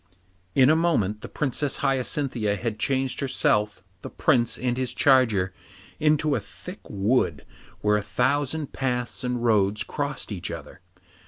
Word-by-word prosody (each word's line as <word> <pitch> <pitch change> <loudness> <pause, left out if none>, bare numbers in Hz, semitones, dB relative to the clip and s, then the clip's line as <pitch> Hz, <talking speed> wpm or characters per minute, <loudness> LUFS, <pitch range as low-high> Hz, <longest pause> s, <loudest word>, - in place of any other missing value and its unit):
In 135 +1 +6
a - - +4
moment 110 - +1
the - - -8
Princess 145 0 -1
Hyacinthia 130 -5 0
had 110 0 -4
changed 135 +1 0
herself, 105 -6 0 0.2
the - - -7
Prince, 120 -6 +1
and 125 0 -1
his 130 -1 -3
charger 115 -9 +3 0.5
into 150 0 +2
a 130 - +1
thick 105 - -11
wood 100 - 0 0.4
where 105 0 +3
a - - -1
thousand 140 +8 -1
paths 125 -2 -2
and 125 -1 -2
roads 105 -2 +2
crossed 145 -5 -4
each 95 -4 -4
other. 90 - -8
125 Hz, 145 wpm, -25 LUFS, 105-140 Hz, 0.5 s, In